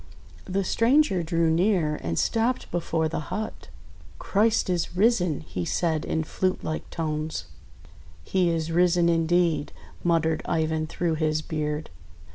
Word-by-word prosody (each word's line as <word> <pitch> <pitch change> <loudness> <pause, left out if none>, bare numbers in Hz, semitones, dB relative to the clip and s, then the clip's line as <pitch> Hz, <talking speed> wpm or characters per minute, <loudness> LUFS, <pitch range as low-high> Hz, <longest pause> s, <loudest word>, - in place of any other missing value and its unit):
The 195 +1 -1
stranger 230 - +3
drew 165 -1 +1
near, 170 -3 +2
and 85 0 -3
stopped 230 +3 0
before 165 -2 0
the - - -3
hut. 215 - -5 0.5
"Christ 215 - +2
is 180 -1 -1
risen!" 185 - +2
he 90 - -5
said 160 - 0
in 160 - -1
flute 185 +4 -1
like 155 - -4
tones. 155 -1 -3 0.8
"He 180 - +1
is 165 -1 -1
risen 175 0 +3
indeed!" 165 -2 +2 0.3
muttered 165 -2 +2
Ivan 160 -1 0
through 165 0 -1
his 155 0 +1
beard. 155 -1 -3
165 Hz, 130 wpm, -26 LUFS, 155-180 Hz, 0.8 s, stranger